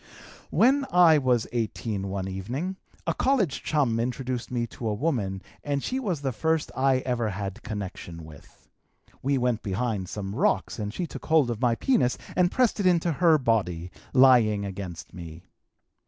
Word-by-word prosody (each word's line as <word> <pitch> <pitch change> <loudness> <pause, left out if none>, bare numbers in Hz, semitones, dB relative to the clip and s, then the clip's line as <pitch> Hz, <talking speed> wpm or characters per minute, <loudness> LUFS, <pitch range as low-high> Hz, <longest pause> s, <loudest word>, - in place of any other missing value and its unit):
"When 275 +4 +4
I 170 -3 +6
was 125 -4 +2
18 110 -3 -2
one 95 -1 -3
evening 120 - -4 0.3
a - - +1
college 240 - +1
chum 135 -7 +1
introduced 125 0 -3
me 120 -1 -1
to 115 0 -6
a 105 - 0
woman 105 -9 -1 0.2
and 140 -1 -1
she 260 - -1
was 185 - -2
the 135 -2 -1
first 160 +6 0
I 130 -1 +2
ever 120 -3 0
had 100 0 -5
connection 90 -5 -6
with. 75 -2 -16 0.5
We 140 +1 +1
went 125 -3 0
behind 100 -1 -2
some 100 -2 -5
rocks - - 0
and 105 -1 -3
she 175 +10 -3
took - - -9
hold 155 -6 +4
of 115 0 -5
my 120 -2 +3
penis 215 - +2 0.2
and 180 -1 +4
pressed 250 -4 +2
it 195 - +2
into 170 -1 +3
her 165 +1 +4
body, 95 - 0 0.2
lying 120 -6 +5
against 95 -4 -7
me. 85 -1 -9
120 Hz, 170 wpm, -26 LUFS, 100-155 Hz, 0.5 s, I